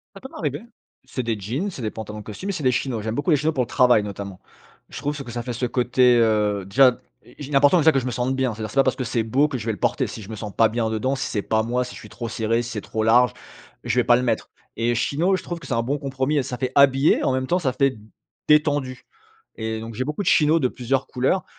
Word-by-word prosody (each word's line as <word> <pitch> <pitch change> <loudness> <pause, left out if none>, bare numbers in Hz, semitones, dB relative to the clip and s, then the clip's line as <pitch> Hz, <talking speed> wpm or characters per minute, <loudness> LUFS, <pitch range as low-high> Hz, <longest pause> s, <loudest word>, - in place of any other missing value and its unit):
Ça 195 - -11
peut 265 - -9
m'arriver. 145 - -4 0.4
C'est 130 - -4
des 115 -2 -2
jeans, 130 - -3
c'est 130 - -8
des 110 - -2
pantalons 105 -1 -7
de - - -11
costume, 185 - -6
et - - 0
c'est 160 - -5
des 130 -1 +3
chinos. 115 -1 -2
J'aime 110 +1 -3
beaucoup 145 +6 -1
les 150 - +5
chinos 155 +3 0
pour 130 - +1
le - - -17
travail, 125 -5 +4
notamment. 100 -2 -7 0.5
Je - - -8
trouve 145 0 -3
ce 140 - -5
que 120 - -9
ça 120 -1 -4
fait 125 0 -4
ce 125 +2 -2
côté, 125 0 +3
heu 105 -3 +2
déjà, 125 +4 +4 0.4
il 145 0 -8
est - - -4
important, 145 +6 +5
déjà, 160 0 +5
que 135 - +2
je 130 - -6
me - - -1
sente 125 +2 -1
bien, 130 -3 0
c'est-à-dire 110 -1 -6
c'est - - -12
pas 135 - +6
parce - - +1
que 130 - -3
c'est 115 0 -1
beau 130 +7 +2
que 135 - -3
je 110 - -7
vais 110 - +1
le 100 - -8
porter. - - 0
Si 110 - -8
je 100 - -11
me 110 - -6
sens 105 -1 -6
pas 115 -1 +4
bien 110 0 -1
dedans, 120 +5 -1
si - - -3
c'est 105 -3 -2
pas 110 0 +1
moi, 125 +2 -1
si - - -9
je - - -10
suis - - -12
trop 120 -2 -6
serré, 115 +1 0
si 120 - -7
c'est 105 -3 -4
trop 110 - -3
large, 120 +2 +5 0.5
je 125 - 0
vais - - 0
pas 120 0 +5
le 125 - 0
mettre. 125 - -1 0.3
Et 120 +1 +1
chino, 170 +10 +1
je - - -7
trouve 175 -1 -5
que 140 - -11
c'est - - -4
un 115 - +1
bon 145 +4 -1
compromis 135 +1 -2
et - - +2
ça 125 -1 -5
fait 130 0 -2
habillé, 140 +1 +4
en 130 - +2
même 130 0 -1
temps, 180 +5 +1
ça 130 -5 0
fait 135 -2 +1 0.5
détendu. 145 -4 +2 0.5
Et 110 0 -3
donc 115 0 -8
j'ai 130 - -2
beaucoup 150 +8 -3
de - - -8
chinos 155 +2 +4
de 130 - +2
plusieurs 135 +2 -2
couleurs 135 +9 0
125 Hz, 295 wpm, -23 LUFS, 115-140 Hz, 0.5 s, pas